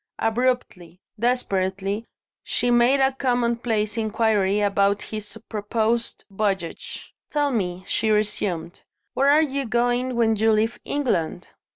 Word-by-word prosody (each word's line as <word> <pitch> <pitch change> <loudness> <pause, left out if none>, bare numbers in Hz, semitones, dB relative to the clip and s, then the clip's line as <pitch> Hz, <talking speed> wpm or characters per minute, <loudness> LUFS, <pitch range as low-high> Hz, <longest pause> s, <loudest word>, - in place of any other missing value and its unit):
Abruptly, 225 -7 -1 0.2
desperately, 200 -3 -1 0.4
she 245 0 0
made 240 +3 +4
a 265 0 +4
commonplace 235 -4 0
inquiry 215 -3 +1
about 200 0 +2
his 215 0 -7
proposed 225 +2 -1
voyage. 195 -4 -3 0.2
"Tell 290 -2 +1
me," 185 -6 -2
she 220 +2 0
resumed, 205 -5 -1 0.3
"where 275 +1 +3
are 300 +2 +6
you 275 -3 -2
going 245 +2 +1
when 225 -2 +3
you 220 +1 +3
leave 220 +2 0
England?" 180 - -1
220 Hz, 115 wpm, -24 LUFS, 200-245 Hz, 0.4 s, are